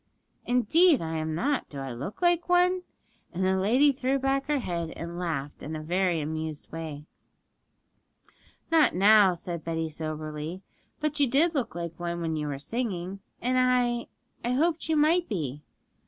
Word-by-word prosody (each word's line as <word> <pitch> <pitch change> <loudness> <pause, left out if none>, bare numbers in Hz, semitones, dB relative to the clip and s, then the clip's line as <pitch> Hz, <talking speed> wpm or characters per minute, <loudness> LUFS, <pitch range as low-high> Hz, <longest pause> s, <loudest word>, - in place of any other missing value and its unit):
'Indeed 280 - +4
I 160 0 -3
am 155 0 -2
not; 275 - -1
do 145 - -8
I 135 -1 -4
look 165 - -6
like 345 0 +2
one?' 360 +1 +4 0.5
And 185 +1 -1
the 190 0 +3
lady 250 +9 +4
threw 270 0 0
back 270 +1 0
her 295 -1 +2
head 170 -9 -3
and 170 +1 -6
laughed 150 -5 -3
in 155 +2 -5
a 155 - -5
very 175 +1 +1
amused 155 0 -5
way. 155 -2 -6 1.7
'Not 315 - +5
now,' 200 -1 +6
said 170 -1 -6
Betty 165 -1 -2
soberly; 155 +3 -5 0.4
'but 300 -1 -1
you 285 - +4
did 315 +7 +3
look 270 - -2
like 170 -1 -5
one 170 0 -3
when 165 -1 -2
you 150 -1 -2
were 140 -2 -3
singing, 195 - -3 0.2
and 255 +1 +2
I 245 -2 +2 0.4
I 245 - 0
hoped 320 +4 +1
you 315 - +3
might 330 +4 +3
be.' 150 - -3
190 Hz, 170 wpm, -27 LUFS, -, 1.7 s, now